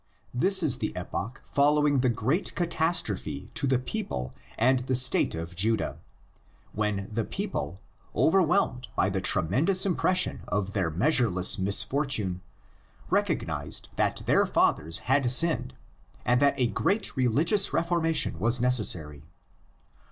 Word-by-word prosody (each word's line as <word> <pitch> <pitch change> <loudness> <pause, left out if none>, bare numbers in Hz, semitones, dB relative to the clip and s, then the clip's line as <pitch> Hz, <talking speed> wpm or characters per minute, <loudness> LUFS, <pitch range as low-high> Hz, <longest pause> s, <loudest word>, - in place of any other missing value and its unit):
This 185 +9 +3
is 135 -5 +2
the 105 - -4
epoch 100 +7 -6
following 145 0 +2
the 130 0 +2
great 130 - -2
catastrophe 170 -1 -2
to 140 - -2
the 130 -1 +2
people 125 - -5 0.2
and 130 +3 +3
the 130 +1 -2
state 130 -8 +3
of 85 +1 -7
Judah, 110 +4 -1 0.7
when 105 -2 -2
the 115 +1 -1
people, 190 - -5 0.4
overwhelmed 160 -7 +1
by 95 - +1
the 95 -1 -2
tremendous 130 - +2
impression 185 0 +1
of 100 -1 -2
their 95 -5 0
measureless 105 - +2
misfortune, 100 -1 +1 0.7
recog - - 0
nised - - -3
that - - -1
their - - +3
fathers 80 +2 +1
had 135 -1 +2
sinned, 145 - +1 0.5
and 125 0 +2
that 140 0 +3
a 125 - +3
great 155 - -1
religious 150 - +2
reformation 165 - 0
was 120 +5 +1
necessary. 95 - +1
125 Hz, 130 wpm, -27 LUFS, 100-160 Hz, 0.7 s, This